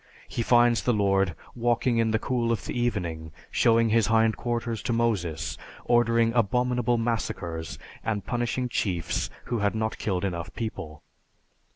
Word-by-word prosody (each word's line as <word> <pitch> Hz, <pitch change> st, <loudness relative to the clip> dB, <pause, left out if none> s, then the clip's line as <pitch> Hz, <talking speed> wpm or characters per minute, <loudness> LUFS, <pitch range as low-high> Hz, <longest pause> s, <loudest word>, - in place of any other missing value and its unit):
He -, -, -3 dB
finds 120 Hz, -2 st, +4 dB
the 120 Hz, +4 st, +1 dB
Lord 95 Hz, -3 st, +2 dB, 0.2 s
walking 120 Hz, 0 st, +1 dB
in 115 Hz, -1 st, +2 dB
the 110 Hz, -, +2 dB
cool 120 Hz, 0 st, 0 dB
of 115 Hz, -, -2 dB
the -, -, -4 dB
evening, 85 Hz, -10 st, -2 dB, 0.2 s
showing 115 Hz, 0 st, +4 dB
his 115 Hz, -1 st, +3 dB
hind 110 Hz, 0 st, +3 dB
quarters 120 Hz, -2 st, -2 dB
to -, -, -2 dB
Moses, 90 Hz, -10 st, -1 dB, 0.3 s
ordering 115 Hz, -1 st, +3 dB
abominable 125 Hz, +1 st, +2 dB
massacres, 95 Hz, -8 st, -3 dB, 0.3 s
and 105 Hz, -2 st, -2 dB
punishing 120 Hz, 0 st, -1 dB
chiefs 90 Hz, -8 st, -1 dB, 0.2 s
who 120 Hz, -1 st, -2 dB
had 100 Hz, +1 st, +1 dB
not 110 Hz, 0 st, -2 dB
killed 95 Hz, -2 st, -1 dB
enough 90 Hz, 0 st, -4 dB
people. 95 Hz, -9 st, -5 dB
115 Hz, 150 wpm, -27 LUFS, 95-120 Hz, 0.3 s, finds